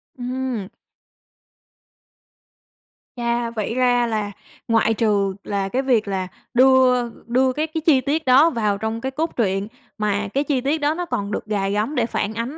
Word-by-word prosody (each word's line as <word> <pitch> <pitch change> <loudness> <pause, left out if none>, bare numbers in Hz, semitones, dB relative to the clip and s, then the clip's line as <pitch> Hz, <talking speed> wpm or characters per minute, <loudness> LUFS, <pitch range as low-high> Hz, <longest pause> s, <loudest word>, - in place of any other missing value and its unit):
Ừm. 250 -4 -3 2.5
Chà! 235 -1 -1
Vậy 225 -1 -3
ra 245 -1 +3
là 210 -2 -2 0.4
ngoại 225 -1 +3
trừ 205 -3 +1
là 195 -1 -2
cái 255 +6 0
việc 240 -6 +1
là 190 -2 -2 0.3
đưa 255 -1 +4 0.2
đưa 255 +2 +2
các 310 +3 -2
cái 320 - -1
chi 275 -5 +5
tiết 310 +4 -1
đó 270 +6 +6
vào 215 -7 0
trong 220 +2 -3
cái 265 - -3
cốt 315 +4 -2
truyện, 195 -3 0 0.3
mà 210 -1 -1
cái 280 +2 +1
chi 275 -3 0
tiết 280 +5 0
đó 295 +2 +2
nó 355 +2 -3
còn 205 -10 -3
được - - -3
gài 200 -2 -1
gắm 215 +9 -1
để 235 - +2
phản 220 -2 -2
ánh 235 +7 -4
235 Hz, 170 wpm, -21 LUFS, 210-265 Hz, 2.5 s, đó